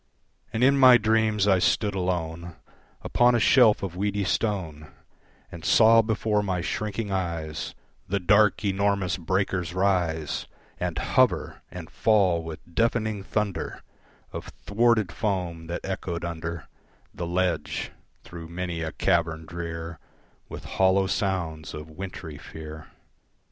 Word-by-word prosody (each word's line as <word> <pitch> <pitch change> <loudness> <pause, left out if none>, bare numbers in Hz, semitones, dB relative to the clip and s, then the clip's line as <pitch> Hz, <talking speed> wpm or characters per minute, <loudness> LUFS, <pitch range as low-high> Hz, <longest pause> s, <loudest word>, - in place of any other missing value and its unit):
And 110 - 0
in 140 +1 +5
my 130 -2 +9
dreams 110 -2 +2
I 95 -2 +4
stood 105 +3 +1
alone 85 -2 -3 0.5
Upon 120 0 +3
a - - +3
shelf 115 -3 +5
of 90 -3 -4
weedy 100 +1 -1
stone, 90 -6 -2 0.6
And 85 -2 -9
saw 115 0 +6
before 110 -1 0
my 95 -3 -1
shrinking 105 +2 -3
eyes 85 -5 -3 0.3
The 100 +1 0
dark, 100 +2 +3
enormous 100 -1 +1
breakers 90 -1 -1
rise, 90 -5 0 0.3
And - - -2
hover - - +1
and - - -8
fall 95 -6 +3
with 80 +1 -9
deafening 110 -1 0
thunder 100 -4 -3 0.5
Of - - -6
thwarted 110 -3 +1
foam 90 -4 -3
that 85 +1 -4
echoed 85 -3 -4
under 85 -1 -5 0.5
The 85 - -5
ledge, 90 0 -1 0.3
through 85 -1 -10
many 85 -1 -4
a 80 0 -4
cavern 80 -3 0
drear, 85 -1 -6 0.5
With - - -8
hollow 95 +1 +2
sounds 90 -6 -2
of 75 +1 -9
wintry 80 -3 -7
fear. 80 -1 -9
95 Hz, 130 wpm, -26 LUFS, 85-105 Hz, 0.6 s, my